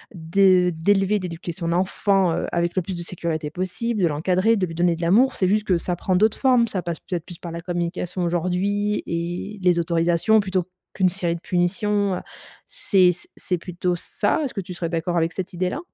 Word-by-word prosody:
de 180 +2 +3
d'élever, 195 +4 +2
d'éduquer 170 -1 -5
son 170 -1 -3
enfant, 190 0 +2
heu, - - -2
avec 170 0 0
le 185 - +2
plus 185 +1 -5
de 170 - -5
sécurité 165 -3 -3
possible, 195 +6 -2
de 170 - +5
l'encadrer, 185 +8 +2
de 185 - +1
lui 165 - -7
donner 175 0 +2
de 165 - -9
l'amour. 235 +10 +4
C'est 185 - +1
juste 210 +2 +1
que 185 - +3
ça 175 +1 -2
prend 185 +2 -1
d'autres 215 +4 +2
formes. 250 -3 +4
Ça 195 -5 -3
passe, 170 -2 -4
peut-être, 175 -3 -5
plus 175 -2 -10
par 170 - -7
la 170 0 -6
communication 175 +1 -3
aujourd'hui 185 +4 0
et 175 +5 -4
les 180 -1 +3
autorisations 170 +5 +2
plutôt 190 -3 -1 0.3
qu'une 185 -2 +2
série 175 -2 -1
de 170 - -9
punitions. 195 +3 0
Heu, - - -3 0.5
c'est 195 - +3
c 175 - -5
c'est 180 - -1
plutôt 180 0 -2
ça? 205 - -1
Est-ce 270 - -3
que 195 - -2
tu 180 0 -8
serais 170 -1 -3
d'accord 170 +1 -2
avec 165 0 +1
cette 185 -1 -5
idée-là? 180 - -2
180 Hz, 210 wpm, -23 LUFS, 170-195 Hz, 0.5 s, de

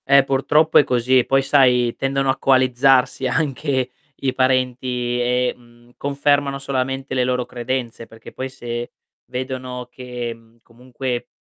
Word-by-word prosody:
Eh, 140 0 +6
purtroppo 150 +4 +3
è - - +6
così, 125 0 +2
e 125 - +1
poi, 135 0 +2
sai, 125 -4 +3
tendono 135 0 -1
a 130 - +1
coalizzarsi 130 0 +3
anche 135 -2 -1 0.2
i 135 -2 -2
parenti 125 -1 0
e, 125 +1 +1
mhmm, 120 0 -22
confermano 140 0 +1
solamente 135 0 -3
le 130 -1 +2
loro 125 0 0
credenze, 120 -2 -4
perché 115 0 -13
poi 130 0 -5
se 120 -2 -6 0.3
vedono 125 -1 -5
che, 125 -2 -6
mhmm, 115 0 -22
comunque 125 +1 -5
130 Hz, 140 wpm, -21 LUFS, 120-135 Hz, 0.3 s, Eh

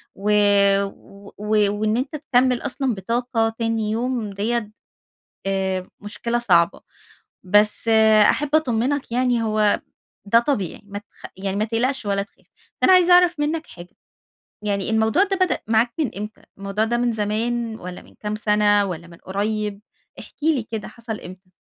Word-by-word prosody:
و 205 +2 -1 0.6
و 200 0 -16
و 210 0 +2
وإن 215 +1 +1
أنت 265 +4 -3
تكمل 255 -4 +1
أصلًا 270 -3 -2
بطاقة 230 +3 -1
تاني 225 -2 -1
يوم، 235 -1 -2
ديّة 215 +2 -2 0.8
آآ، 190 -1 -1
مشكلة 235 +3 -3
صعبة. 175 -8 +2 0.6
بس، 210 +4 +2 0.4
أحب 295 0 +1
أطمنك 265 -2 0
يعني، 245 -1 +1
هو 215 -1 +2 0.5
ده 230 +3 +5
طبيعي، 235 - -2
ما 205 0 -7
تخ 205 - -13
يعني 195 +1 -3
ما 210 - +1
تقلقش 235 +2 -1
ولا 200 0 0
تخاف. 200 - -17 0.3
فأنا 375 - +5
عايزة 360 -1 +6
أعرف 355 -3 +5
منك 310 +2 -1
حاجة، 175 0 -13 0.7
يعني 200 -1 -1
الموضوع 220 - +3
ده 390 -1 -1
بدأ 370 -1 +1
معاك 230 +2 +2
من 290 -7 0
إمتى؟ 210 +1 -7 0.2
الموضوع 200 +2 -2
ده 240 +1 0
من 240 0 +1
زمان، 225 +2 -2
والّا 180 0 -8
من - - -20
كام 210 0 -3
سنة، 210 -1 +3
والّا 170 -3 -6
من 170 0 -14
قريب؟ 205 +2 -3 0.4
احكِ - - -12
لي 305 -6 +2
كده، 220 -1 -6
حصل 230 -2 -7
إمتى؟ 185 +1 -12
220 Hz, 155 wpm, -22 LUFS, 205-245 Hz, 0.8 s, عايزة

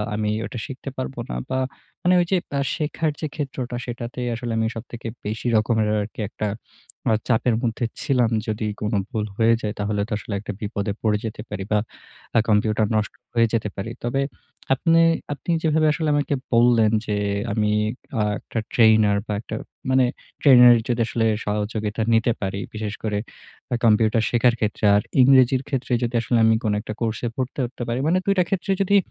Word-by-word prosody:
আমি 105 0 -1 0.2
ওটা 120 - -6
শিখতে 135 -1 -7
পারবো 130 0 -4
না। - - -3
বা 130 - 0 0.5
মানে 180 - +4
ওই - - +1
যে 190 - +4 0.4
শেখার 155 0 -1
যে 155 - -2
ক্ষেত্রটা, 130 -4 -4
সেটাতেই 120 0 -5
আসলে 120 0 -4
আমি 110 0 +1
সবথেকে 115 0 -7 0.2
বেশি 110 +3 -3
রকমের 110 0 +2
আরকি 105 +2 -7
একটা 105 - -3 0.6
আ - - +4
চাপের 120 -1 +2
মধ্যে 120 0 -1 0.2
ছিলাম। 130 -6 +2 0.2
যদি 110 0 -2 0.2
কোন 105 +2 -1 0.2
ভুল 110 -4 -2
হয়ে 115 0 +4
যায়, 105 0 -2
তাহলে 105 0 -1
তো - - -17
আসলে 105 - -7
একটা 105 - -6
বিপদে 100 -1 -2
পড়ে 105 -2 +2
যেতে 105 -1 -5
পারি 95 - -4
বা 105 - +4 0.6
আ - - +7
কম্পিউটার 105 0 +2
নষ্ট 110 0 0 0.2
হয়ে 115 -1 +4
যেতে 110 -2 0
পারি। 100 +4 -4
তবে 130 +3 0 0.5
আপনে 165 +4 +3 0.3
আপনি 145 - -4
যেভাবে 155 -1 +3
আসলে 155 0 -1
আমাকে 145 -1 0 0.2
বললেন 115 -2 +5
যে, 105 - -2 0.4
আমি 105 0 +1 0.5
অ - - +3 0.2
১ - - -14
টা 115 - 0
ট্রেনার 110 -3 +5
বা 105 - -2
১ - - -10
টা - - -1 0.3
মানে 130 0 +4 0.4
ট্রেনারের 125 -4 +8
যদি 120 -1 +1
আসলে 115 -2 0 0.2
সহযোগিতা 105 +1 -2
নিতে 115 +1 +3
পারি, 100 0 -2
বিশেষ 110 -1 -4
করে 105 -2 -1 0.7
কম্পিউটার 110 0 +4
শেখার 120 0 +3
ক্ষেত্রে। 105 0 -1
আর 100 - +4 0.2
ইংরেজির 130 0 +5
ক্ষেত্রে 130 -2 -2
যদি 120 0 -1
আসলে 120 0 +1 0.2
কোন 105 -2 +1
একটা 110 - -6
কোর্সে 115 +1 -1
ভর্তি 130 +1 -3
হতে 120 0 -6
পারি। 120 +2 -1
মানে 175 +3 +3
দুইটা 195 -2 +3
ক্ষেত্রে 195 0 -1
যদি 195 +1 +3
115 Hz, 180 wpm, -23 LUFS, 110-130 Hz, 0.7 s, ট্রেনারের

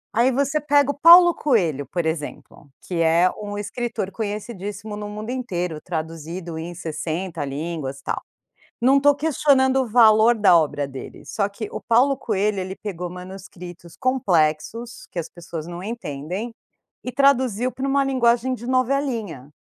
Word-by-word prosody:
Aí, 245 +3 +4
você 280 +3 0
pega 285 -1 +3
o - - -6
Paulo 345 +2 +9
Coelho, 170 - 0
por 175 +1 -2
exemplo, 150 -2 -5
que 175 -2 -2
é 165 +2 +4
um 205 0 -5
escritor 210 -1 -4
conhecidíssimo 210 -1 -5
no 210 0 -6
mundo 215 +3 -6
inteiro, 180 -11 -3
traduzido 165 +1 -5
em 175 +2 -6
60 165 +1 -4
línguas, 140 -1 -4
tal. - - -3 0.6
Não 270 +3 +5
tô 290 +1 +5
questionando 275 -3 +3
o 250 - -3
valor 220 0 +6
da 205 -5 +5
obra 145 -3 0
dele, 135 -1 -9
só 200 -2 -1
que 205 +2 -7
o - - -5
Paulo 260 +4 +3
Coelho, 210 -4 -1
ele 185 +1 -5
pegou 180 -4 -5
manuscritos 180 -2 -10
complexos, 230 - 0
que - - -4
as 165 - -5
pessoas 170 -2 -8
não 175 +1 -7
entendem, 195 0 -5 0.5
e 250 - -4
traduziu 255 -3 +2
pra 265 +2 -4
uma 275 0 +2
linguagem 255 -1 +2
de 240 0 -10
novelinha. 245 - -1
205 Hz, 155 wpm, -22 LUFS, 170-255 Hz, 0.6 s, Paulo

